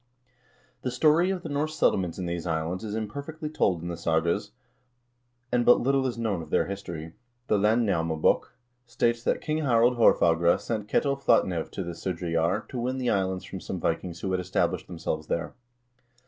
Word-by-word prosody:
The 130 - -2
story 155 +8 +3
of 185 -2 -2
the 160 - -5
Norse 150 +2 -1
settlements 90 - +1
in 95 - -3
these 85 0 -3
islands 80 +4 -2
is 105 -1 -4
im 110 -1 -2
perfectly 150 +6 -6
told 90 - +1
in - - -4
the 85 - -3
sagas, 85 +5 0 1.0
and 120 0 +2
but 120 - +6
little 135 +1 +2
is 125 - -4
known 110 -7 -1
of 80 - -10
their - - +2
history.1 85 -5 -6 0.3
The 105 - +2
"Landnamabok" 100 -8 +2 0.4
states 120 0 0
that - - 0
King 155 0 -1
Harald 120 -4 +3
Haarfagre 85 -6 +4
sent 105 -3 -3
Ketil 140 +4 +1
Flatnev 90 -10 +2
to 95 - -5
the 85 - -5
Sudreyjar 85 -2 -1
to 125 - -4
win 130 +2 -1
the 125 -2 0
islands 95 -2 -1
from 95 - -7
some 90 - -5
Vikings 85 +1 -2
who 95 - -2
had 95 - +1
established 90 +1 -1
themselves 80 -3 -4
there. 85 - -2
100 Hz, 180 wpm, -27 LUFS, 85-125 Hz, 1.0 s, but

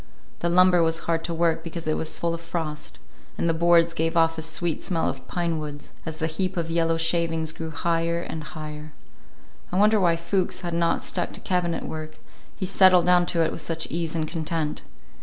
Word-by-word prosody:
The 170 - 0
lumber 180 0 +5
was 165 0 +1
hard 165 -1 0
to 170 - -2
work 165 -1 +1
because 165 0 -6
it 155 - +1
was 160 - -1
full 170 0 0
of 170 - -5
frost, 160 -3 -5 0.4
and - - 0
the 165 - +3
boards 170 0 +4
gave 165 +1 0
off 165 0 +4
a 160 - -4
sweet 160 +1 -1
smell 165 -3 0
of 135 - -5
pine 170 -2 -1
woods, 145 -1 -8
as 160 -1 -5
the 160 - -1
heap 185 +3 -2
of 165 -1 -2
yellow 165 -1 +2
shavings 165 -1 +1
grew 160 0 -6
higher 165 +1 0
and 160 -2 -5
higher. 150 -1 -8 0.8
I 180 - -1
wondered 210 +2 +5
why 170 -2 +4
Fuchs 180 +3 -1
had 175 -2 -4
not 170 0 +1
stuck - - -1
to - - -7
cabinet 180 -2 -1
work, 155 0 -6 0.4
he 190 - -3
settled 185 -2 +5
down 180 -1 +4
to 165 -1 +2
it - - -1
with - - -3
such 165 -1 -2
ease 165 -1 -2
and 155 -1 -1
content. 160 -1 -2
165 Hz, 210 wpm, -25 LUFS, 160-170 Hz, 0.8 s, lumber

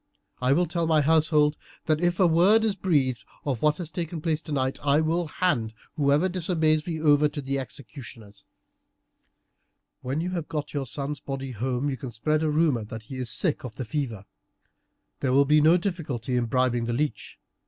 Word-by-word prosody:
I 125 +2 +3
will 175 +5 +3
tell 170 0 -1
my 155 -2 +4
household 150 -1 +3 0.3
that 155 0 +1
if 175 0 +1
a 190 - +6
word 185 +7 +4
is 215 - +1
breathed 145 -10 0 0.2
of 135 -6 -2
what 150 0 +3
has 170 -3 -5
taken 165 0 -4
place 155 -1 -1
tonight, 135 -5 -2
I 145 +1 +3
will 165 +2 0
hand 120 -10 -1 0.2
whoever 145 +3 +3
disobeys 165 -4 0
me 165 -2 -3
over 150 -1 +4
to 145 - -6
the 140 0 -2
executioners. 120 -5 -10 1.6
When 130 +4 -2
you 180 +2 -2
have 170 -4 -3
got 150 -2 -4
your 140 -3 -2
son's 140 +3 -3
body 135 -1 -5
home 125 +3 -2
you 135 -2 -2
can 130 - -6
spread 150 +7 0
a 160 - +1
rumour 150 -6 +2
that 110 +1 -8
he 130 +4 -8
is 125 -2 -1
sick 155 +4 +1
of 120 -4 -7
the 130 - -5
fever. 115 -6 -4 0.9
There 130 -2 0
will 140 +1 +5
be 150 +2 +4
no 160 +4 +6
difficulty 150 - -3
in 120 -1 +1
bribing 120 0 +1
the 120 - -2
leech. 145 +4 -3
150 Hz, 190 wpm, -26 LUFS, 130-160 Hz, 1.6 s, a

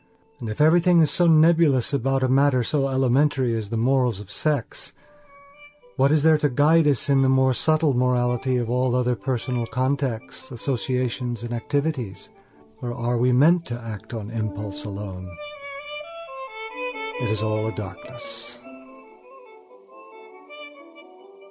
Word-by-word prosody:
And 115 -4 -5
if 105 - -6
everything 170 +3 +5
is 155 - +3
so 175 - +3
nebulous 155 -5 +4
about 135 0 0
a - - +3
matter 130 -1 +3
so 135 +3 0
elementary 130 -1 +2
as 110 -3 -4
the 115 - -2
morals 125 -2 +1
of 105 -1 -11
sex, 150 -6 -2 1.0
what 135 +2 +3
is 155 -1 +3
there 160 -1 +5
to 150 - +1
guide 150 +4 +4
us 140 -5 +1
in 140 -1 +3
the 135 - +3
more 130 0 +3
subtle 155 +1 +2
morality 125 0 +1
of 120 -2 -1
all 125 +1 0
other 125 -1 +1
personal 120 +1 -3
contacts, 130 -1 -2
associations, 125 -1 -2
and 120 0 -5
activities? 130 -3 -3 0.5
Or 120 -1 -4
are 120 0 -1
we 125 +1 +3
meant 165 +7 +4
to 120 -1 -5
act 115 -2 -8
on 110 0 -6
impulse 100 -3 -4
alone? 95 -2 -7 1.9
It - - -1
is 110 -1 -1
all 110 0 -1
a - - -2
darkness. 115 +4 -8
125 Hz, 135 wpm, -23 LUFS, 115-140 Hz, 1.9 s, everything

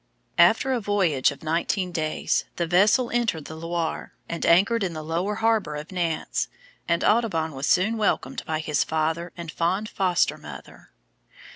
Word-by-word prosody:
After 265 - +5
a 250 - 0
voyage 190 - +2
of 140 - -9
nineteen 175 +4 -1
days 155 -2 -1
the 170 - -1
vessel 210 +8 +3
entered 225 -11 0
the 160 - -8
Loire, 165 0 -4
and 170 - -3
anchored 200 +6 +4
in 180 -3 -2
the 155 -1 -6
lower 175 +6 -1
harbour 220 -8 +1
of 150 +4 -7
Nantes, 170 -3 -1 0.4
and 170 0 +1
Audubon 195 -9 +2
was 135 +2 -3
soon 215 +6 +3
welcomed 200 -11 -1
by 155 0 -1
his 150 -2 +1
father 160 +2 -1
and 170 -2 -6
fond 185 +7 -1
foster 185 -3 +1
mother. - - -12
170 Hz, 160 wpm, -25 LUFS, 160-205 Hz, 0.4 s, After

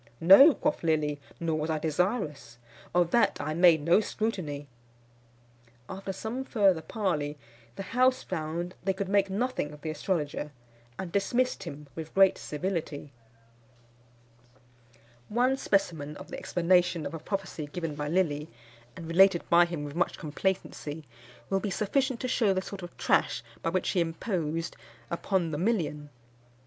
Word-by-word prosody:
"No," 200 - +9
quoth 295 - -1
Lilly, 150 -3 0 0.2
"nor 160 -2 -1
was 155 +1 -2
I 160 - +1
desirous. 155 - -1 0.3
Of 175 -1 +2
that 240 - +3
I 150 +1 -2
made 165 -2 +5
no 170 +5 +5
scrutiny." 185 -10 -3 1.2
After 195 +4 -5
some 220 +7 -4
further 200 -10 +3
parley, 155 -6 -2 0.4
the 195 - -5
house 255 +5 +2
found 170 +1 -4
they 195 +1 +1
could 190 0 -3
make 200 -1 +3
nothing 210 -6 -1
of 150 0 -12
the 155 - -3
astrologer, 150 -2 -2 0.4
and 185 -3 -5
dismissed 245 +7 0
him 145 +1 -8
with 160 -1 -8
great 195 -1 +5
civility. 155 -3 -4 2.2
One 250 +4 +2
specimen 165 - -1
of - - -11
the - - -6
explanation 175 -2 +2
of - - -5
a 165 - -5
prophecy 180 -3 -4
given 165 -3 -3
by 145 0 -4
Lilly, 155 -3 0 0.5
and 165 - -8
related 175 +1 +4
by 170 0 +7
him 170 -4 -5
with 145 -1 -6
much 175 +2 0
complacency, 155 -2 -3 0.5
will 195 - +2
be 205 - -3
sufficient 255 +6 0
to 255 - -1
shew 220 -6 +2
the 185 - -1
sort 200 -1 -7
of 175 0 -10
trash 115 - +1 0.2
by - - 0
which 185 +2 0
he 185 - +1
imposed 165 -1 -2 0.4
upon 170 -1 0
the 150 - -3
million. 165 -8 -1
175 Hz, 150 wpm, -29 LUFS, 155-195 Hz, 2.2 s, No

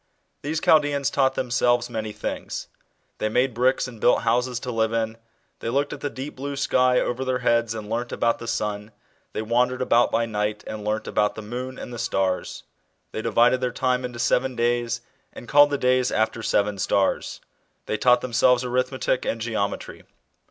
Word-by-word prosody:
These 155 +2 -2
Chaldeans 145 -3 +3
taught 135 -1 +2
themselves 120 -1 +1
many 110 -3 -4
things. - - -5 0.5
They 110 - 0
made 125 +3 +1
bricks 125 +3 +2
and 115 -3 -11
built - - +4
houses 125 +1 +1
to 125 - -4
live 110 -1 +1
in, 110 -1 -1 0.4
they - - -3
looked 140 +4 0
at 150 - -8
the 145 - -2
deep 135 +2 -7
blue 140 +2 -5
sky 130 -2 +3
over 125 +2 -1
their 130 -1 0
heads 115 -1 +2
and 110 -2 -6
learnt 120 +2 -3
about 115 0 +1
the 115 - -7
sun; 105 -1 -3 0.4
they 110 - -2
wandered 125 +3 +1
about 120 -1 +3
by 115 +1 +1
night 105 -1 -2
and 110 -1 -6
learnt 105 +1 -2
about 105 0 +1
the 110 - -7
moon 125 +4 -5
and 125 - -8
the 120 - -6
stars, 95 -5 -1 0.5
they 110 - -4
divided 120 +3 +3
their 125 - +1
time 125 +1 0
into 125 -1 -5
seven 125 +2 +1
days 120 0 0 0.3
and 120 - -10
called 145 +2 +6
the 145 - 0
days 125 -1 +2
after 110 +1 0
seven 105 -2 0
stars, 95 0 0 0.5
they - - -2
taught 125 +3 +4
themselves 125 +1 +3
arithmetic 130 +1 0
and 115 - -2
geometry. 110 -3 -3
120 Hz, 185 wpm, -24 LUFS, 110-130 Hz, 0.5 s, called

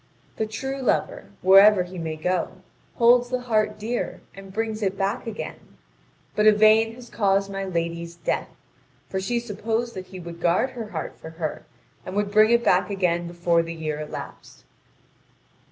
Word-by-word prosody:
The 220 - -1
true 270 +5 -4
lover, 255 - 0 0.2
wherever 195 +1 +7
he 180 0 -8
may 160 -1 -3
go, 180 +2 -1 0.4
holds 245 +1 +5
the 255 0 -1
heart 215 -3 0
dear 230 +3 -3
and 195 0 -11
brings 220 +1 -2
it 195 -1 -1
back 195 +3 -1
again. 220 -2 -7 0.6
But 210 0 +4
Yvain 215 +1 +5
has 245 0 -12
caused 200 -2 +1
my 195 0 -3
lady's 170 -1 -3
death, 170 - -2 0.6
for 190 - -2
she 235 +5 0
supposed 230 +1 -3
that 185 -1 -7
he 185 - -9
would 170 -1 -9
guard 180 +10 +2
her 235 -4 -6
heart 165 -5 -6
for 160 - -9
her, 160 -1 -5 0.4
and 185 - -7
would 205 -1 0
bring 215 +1 +6
it 235 0 +4
back 180 +3 +3
again 175 -3 0
before 170 -1 +1
the 165 0 -6
year 155 -2 -3
elapsed. 150 0 -8
195 Hz, 170 wpm, -24 LUFS, 175-220 Hz, 0.6 s, wherever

